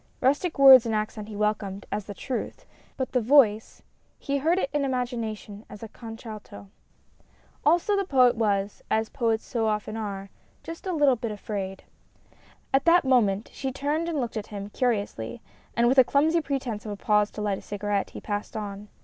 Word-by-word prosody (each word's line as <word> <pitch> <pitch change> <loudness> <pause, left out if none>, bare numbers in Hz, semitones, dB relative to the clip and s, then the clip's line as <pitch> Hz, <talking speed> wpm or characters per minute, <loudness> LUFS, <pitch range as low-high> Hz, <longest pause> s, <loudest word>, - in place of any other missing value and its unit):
Rustic 290 +6 +1
words 265 -4 +9
and 220 - 0
accent 215 0 -3
he 215 - -8
welcomed 205 -2 -2
as 210 - -3
the 205 - -8
truth, 270 - -5 0.3
but 260 - -3
the 250 - +1
voice 225 -4 +3 0.3
he 280 0 -2
heard 325 +6 +2
it 275 - -1
in 295 -1 +1
imagination 230 -5 -3
as 210 - -10
a - - -5
contralto. 220 -3 -10 0.9
Also 345 +7 +3
the 395 - +1
Poet 255 -8 +4
was, 205 -3 0
as 220 0 +1
poets 225 -2 -1
so 225 -2 -1
often 215 0 -2
are, 200 -3 -5 0.3
just 330 +3 -8
a - - 0
little 290 -6 +4
bit 230 0 -4
afraid. 200 -2 -5 0.9
At 270 - +3
that 340 -2 +5
moment 220 -6 +2
she 265 -1 -3
turned 295 +5 -1
and 315 -4 -1
looked 235 -3 -3
at 210 - -5
him 200 -1 -7
curiously, 210 - -2 0.4
and 235 0 +4
with 260 +2 +5
a - - +9
clumsy 315 +6 +2
pretence 265 -7 -3
of 215 - -6
a - - -4
pause 210 0 +2
to 210 - -6
light 200 -2 -1
a - - -13
cigarette, 205 -1 -2
he - - -9
passed 205 0 -4
on. 205 -1 -6
225 Hz, 185 wpm, -26 LUFS, 210-270 Hz, 0.9 s, words